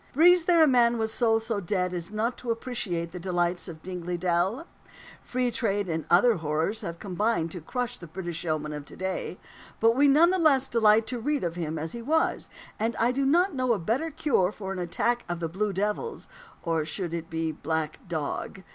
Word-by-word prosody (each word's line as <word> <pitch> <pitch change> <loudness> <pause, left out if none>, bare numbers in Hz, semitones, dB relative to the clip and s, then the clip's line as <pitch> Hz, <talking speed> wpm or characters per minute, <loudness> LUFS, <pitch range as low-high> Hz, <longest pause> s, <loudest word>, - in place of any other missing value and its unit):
Breathes 345 +3 +6
there 340 -2 +5
a - - +6
man 240 -3 +4
with 220 -1 -1
soul 225 -1 +2
so 225 -1 -2
dead 180 -1 -1
as 175 0 -4
not 220 +4 -1
to 245 - -7
appreciate 210 -8 -2
the 180 - -7
delights 175 0 -1
of 160 -3 -9
Dingley 180 -1 -4
Dell? 185 - 0 0.6
Free 250 -1 -1
trade 205 -4 -1
and 160 -2 -2
other 210 +6 +5
horrors 160 +7 -1
have 170 -5 -5
combined 195 -2 -1
to 175 - -6
crush 245 +8 -3
the 170 - -10
British 170 0 -5
yeoman 155 -2 -2
of 150 -1 -5
to - - -12
day; 190 -1 -3 0.4
but 225 +1 +4
we 285 +2 +5
none 315 +5 +6
the 375 - +1
less 275 -5 +4
delight 220 -1 +4
to 245 +1 -3
read 290 +4 -1
of 170 -1 -1
him 160 -2 -3
as 160 +1 -4
he 235 - -6
was, 315 +7 0 0.3
and 225 +2 0
I 235 +2 +2
do 270 +1 0
not 355 +6 +3
know 255 -3 +1
a - - 0
better 230 - -1
cure 280 - +1
for 195 -2 -6
an 190 - -5
attack 235 +8 0
of 175 -1 -3
"blue 205 +3 -1
devils" 210 - -2 0.4
or 165 -2 0
should 170 +2 -4
it 165 -1 -4
be 160 0 -1
"black 160 -1 -3
dog?" 170 +3 -4
200 Hz, 210 wpm, -27 LUFS, 170-245 Hz, 0.6 s, Breathes